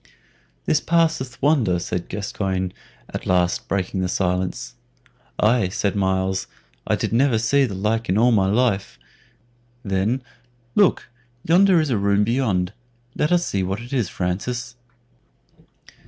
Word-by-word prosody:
"This 155 - +2
passeth 165 -7 0
wonder," 130 - +3
said 85 0 -4
Gascoyne, 95 -2 -3 0.4
at - - -5
last 90 -1 +1
breaking 95 -1 -1
the 90 - 0
silence. 90 0 -2 0.7
"Aye," 110 -2 +3
said 100 +2 -1
Myles, 95 -1 0 0.4
"I - - +2
did - - -3
never 125 0 +3
see 135 +5 +3
the 100 -6 -5
like 110 +4 -1
in 95 - +2
all 120 +3 +4
my 100 -4 +3
life." 105 -1 0 0.9
Then, 100 +6 0 0.5
"Look, 205 -3 +3 0.4
yonder 180 +2 +5
is 155 -3 0
a 110 - +1
room 100 +1 +2
beyond; 105 -6 0 0.4
let 150 - 0
us 175 -1 +3
see 100 - -1
what 95 +2 -2
it 120 +4 -9
is, 120 -9 0
Francis." 115 +7 -3
105 Hz, 140 wpm, -22 LUFS, 95-125 Hz, 0.9 s, yonder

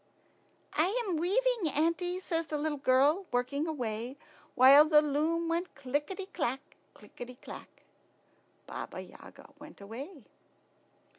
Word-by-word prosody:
"I 315 - +3 0.2
am 365 -5 -1
weaving, 405 - +1
auntie," 335 +4 0
says 330 -3 -2
the 300 - -2
little 295 -1 -2
girl, 285 +8 +3
working 280 +5 -1
away, 245 -3 -4 0.4
while 275 +3 +9
the 305 -1 +6
loom 315 +3 0
went 340 +2 -2
clickety 290 +8 -3
clack, 275 -9 -4 0.2
clickety 245 +1 -10
clack. - - -12 0.8
Baba - - -7
Yaga - - -13
went 300 +1 -13
away. 255 - -9
300 Hz, 120 wpm, -31 LUFS, 270-335 Hz, 0.8 s, while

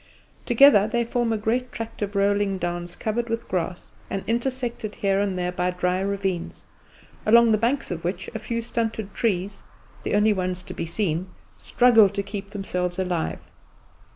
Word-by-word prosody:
Together 240 -4 +7
they 235 +1 0
form 235 0 0
a 220 - +1
great 245 +4 -1
tract 225 -1 -7
of 205 0 -3
rolling 200 0 +2
downs 175 0 -4
covered 235 +2 -2
with 230 0 -3
grass, 180 0 -3 0.2
and 195 - -3
intersected 240 -2 -2
here 195 -1 +1
and 200 -2 0
there 180 0 -1
by 180 0 0
dry 180 0 0
ravines, 195 -3 -3 0.6
along 235 +1 +6
the - - +5
baked 210 - -3
banks 260 +2 0
of 170 -2 -4
which 175 +3 -3
a 220 - -3
few 230 +1 -3
stunted 225 -3 -3
trees 195 -3 -1 0.4
the - - -1
only 210 +1 +4
ones 185 -1 -2
to - - -8
be 165 - -4
seen 175 -1 -1 0.3
struggle 230 -5 +5
to 200 0 -3
keep 200 0 -6
themselves 180 -3 -3
alive. 180 -3 -1
205 Hz, 175 wpm, -24 LUFS, 185-230 Hz, 0.6 s, Together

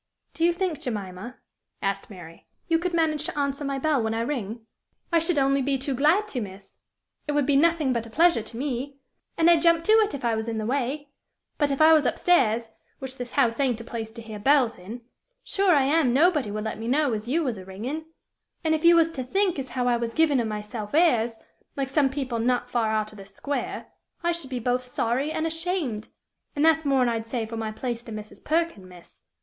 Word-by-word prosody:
"Do 330 - -3
you 345 - +5
think, 345 -3 -2
Jemima," 210 0 -5 0.4
asked 195 0 -2
Mary, 175 -5 -12 0.2
"you 330 -1 +2
could 350 0 -2
manage 310 -2 +1
to - - -5
answer 280 0 -1
my 275 -1 -2
bell 290 -1 +1
when 220 0 -1
I 225 - -1
ring?" 230 -3 -4 0.5
"I 335 - +4
should 330 0 +1
only 275 0 +3
be 275 +1 0
too 275 +1 -2
glad, 305 - +3 0.2
miss; 195 -1 -10 0.5
it 295 - -1
would 290 -2 +2
be 285 0 +2
nothing 310 -2 +3
but 230 -1 -2
a - - -12
pleasure 330 0 +4
to 225 +1 -8
me; 275 +1 -3 0.4
and 330 - +4
I'd 340 -2 +6
jump 335 -1 +4
to 430 - +2
it 435 -4 +4
if 265 - -6
I 235 - +2
was 220 +1 -2
in 225 -1 -2
the 215 - -2
way; 280 +4 -2 0.5
but 290 -2 +3
if 275 +1 -1
I 320 +1 +8
was 300 -5 +4
up - - -1
stairs, 230 -10 +2 0.3
which 265 -1 -7
this 245 -1 -6
house 240 -4 +2
ain't 255 -5 +1
a - - -7
place 225 -1 -6
to 230 -1 -9
hear 215 -2 -8
bells 255 -3 +3
in, 215 +7 -8 0.4
sure 390 -4 +2
I 280 - +4
am 275 -3 +2
nobody 300 - +3
would 210 +1 -4
let 220 0 -4
me 225 - -5
know 280 0 +2
as 215 +1 -4
you 320 +7 +1
was 245 -8 -2
a - - -9
ringin'; 235 +12 -5 0.6
and 315 -1 +2
if 315 0 -1
you 340 0 +7
was 330 -1 +4
to 265 -5 -4
think 370 +4 0
as 265 -1 -5
how 250 0 -1
I 240 -1 +3
was 235 -1 -4
giving 310 -5 +3
of 235 - 0
myself 210 +2 -5
airs, 240 -9 +3 0.4
like 270 -1 -1
some 275 0 +2
people 265 -4 -3
not 245 +1 0
far 230 -3 +1
out 215 -1 -1
of 215 - -13
this 195 0 -12
square, 285 0 -4 0.4
I 345 - +2
should 335 -6 -5
be 255 - -3
both 245 +1 0
sorry 250 +3 -1
and 315 - -2
ashamed 325 - -2 0.5
an' 290 - +1
that's 320 -1 +4
more'n 265 -3 +3
I'd 225 -1 -2
say 230 -1 -2
for 225 +1 -7
my 220 -1 -3
place 235 +1 -4
to 230 - -9
Mrs. 215 0 -9
Perkin, 315 - -1
miss." 175 -1 -16
260 Hz, 230 wpm, -25 LUFS, 225-310 Hz, 0.6 s, I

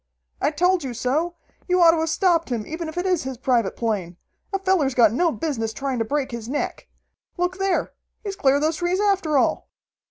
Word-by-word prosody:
"I - - +3
told 355 +3 +2
you 255 -3 -5
so! 305 +9 -1 0.3
You 365 0 +2
ought 335 -2 +8
to 330 - 0
have 320 0 0
stopped 335 -2 +2
him, 230 -4 -2
even 325 +1 -5
if 315 - -10
it 355 - -1
is 365 -4 +2
his 260 -1 -5
private 240 -5 +1
plane! 195 -7 -2 0.3
A 390 - +1
feller's 375 -9 +1
got 225 -3 +5
no 335 +6 +2
business 255 -9 -3
trying 270 -1 -3
to 225 - 0
break 280 +1 -1
his 235 -1 -6
neck! 290 - -3 0.5
Look 360 +1 -1
there! 385 -2 0 0.3
He's 400 -2 -4
cleared 280 -3 +2
those 315 +1 +1
trees 355 +2 0
after 385 -8 +2
all!" - - +1
310 Hz, 210 wpm, -23 LUFS, 255-355 Hz, 0.5 s, ought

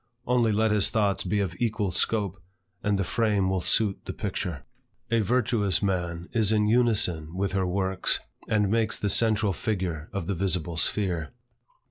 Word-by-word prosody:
Only 120 -2 +2
let 110 +1 +2
his 105 -2 +4
thoughts 100 -3 +1
be 100 +3 0
of 95 -4 -2
equal 105 -4 0
scope, 100 -2 0 0.4
and 100 0 +1
the 100 - 0
frame 105 -2 +1
will 95 -1 0
suit 105 +2 +1
the - - -5
picture. 80 -6 -4 0.5
A 115 - +3
virtuous 110 -4 +1
man 85 -3 -2
is 110 -2 +3
in 105 -1 +2
unison 105 -9 +1
with 100 +1 0
her 95 -1 0
works, 95 0 0 0.3
and 105 -2 +1
makes 110 -1 +1
the 105 - -1
central 110 -2 +2
figure 90 -7 -3
of 100 -4 -4
the 100 - -1
visible 90 -3 -1
sphere. 90 -1 0
100 Hz, 165 wpm, -26 LUFS, 90-110 Hz, 0.5 s, his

